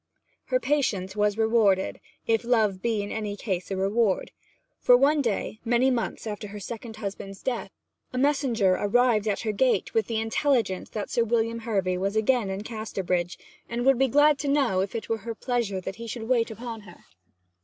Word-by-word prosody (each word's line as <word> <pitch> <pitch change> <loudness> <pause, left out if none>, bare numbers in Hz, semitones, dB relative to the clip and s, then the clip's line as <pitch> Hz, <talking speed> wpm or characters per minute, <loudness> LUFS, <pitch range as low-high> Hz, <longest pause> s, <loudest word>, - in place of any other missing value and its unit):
Her - - +1
patience 210 - 0
was 210 0 +1
rewarded 220 -4 +2 0.3
(if 225 0 +1
love 220 -6 +2
be 225 -3 0
in 205 - -6
any 210 -2 -3
case 185 -5 -3
a 195 - -2
reward); 200 +1 +1 0.5
for 245 - +6
one 290 +3 +3
day, 220 -2 -2
many 240 +3 +3
months 235 -2 -2
after 210 -1 -5
her 205 +1 -8
second 225 +2 -7
husband's 195 -2 -7
death, 250 -3 -2 0.4
a 255 - -5
messenger 255 -8 +2
arrived 220 +2 +2
at 205 - 0
her 220 - -1
gate 250 +4 +1
with 225 - +1
the 225 -2 -1
intelligence 225 -4 0
that 210 -2 -5
Sir 235 - +2
William 230 0 0
Hervy 195 -5 -1
was 195 +2 -1
again 220 -1 +2
in 190 +2 -4
Casterbridge, 190 -6 -2 0.3
and 240 +1 -2
would 270 -2 +4
be 270 - +4
glad 290 +3 +4
to 285 - -3
know 275 -9 +2
if 190 +3 -2
it 225 - -4
were 225 -1 -1
her 230 +2 -6
pleasure 235 -6 -1
that 190 +2 -6
he 230 0 -7
should 230 0 -5
wait 235 -2 +2
upon 230 0 -7
her. 180 -4 -16
225 Hz, 190 wpm, -26 LUFS, 200-245 Hz, 0.5 s, for